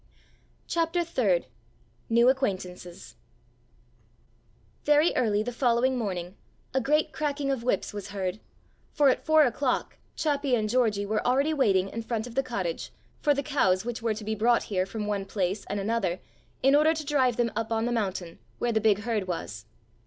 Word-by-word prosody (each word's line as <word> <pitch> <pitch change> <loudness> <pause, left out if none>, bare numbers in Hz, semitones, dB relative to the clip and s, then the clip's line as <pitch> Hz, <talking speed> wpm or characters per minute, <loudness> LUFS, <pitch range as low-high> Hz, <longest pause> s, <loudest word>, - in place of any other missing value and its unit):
*CHAPTER 335 +1 0
THIRD* 215 - +1 0.6
*NEW 235 +2 +5
ACQUAINTANCES* 185 -9 -3 1.7
Very 295 +3 +4
early 215 -4 +2
the 245 - -4
following 245 +1 +2
morning 185 -6 -3 0.4
a 265 - +2
great 300 +5 +1
cracking 285 -2 -1
of 265 -3 -1
whips 235 -5 -1
was 205 -2 -6
heard, 190 0 -3 0.5
for 285 -2 +4
at 255 - 0
four 315 0 +5
o'clock 255 0 -1 0.2
Chappi 285 -4 +1
and 215 -2 0
Georgie 215 -4 +1
were 215 +1 -1
already 275 +5 +2
waiting 195 -10 +2
in 230 +3 -5
front 225 -1 -3
of 245 - -9
the 270 - +2
cottage 195 -10 -4 0.3
for 290 -2 +2
the 280 - -1
cows 190 -10 +1
which 240 0 -4
were 225 -2 0
to 215 - -7
be 220 +1 -2
brought 230 +3 +2
here 185 -2 -1
from 210 +1 -4
one 205 -1 -1
place 195 0 -2
and 200 - -3
another 195 -4 -1 0.4
in 270 +1 +5
order 310 +2 +4
to 310 -1 -5
drive 260 -5 +2
them 235 -2 +1
up 225 +1 -3
on 225 0 +1
the 245 - -1
mountain, 190 -7 -3 0.2
where 240 - 0
the 220 -1 +1
big 210 -1 +3
herd 220 -4 -2
was. 105 - -5
230 Hz, 175 wpm, -27 LUFS, 200-270 Hz, 1.7 s, NEW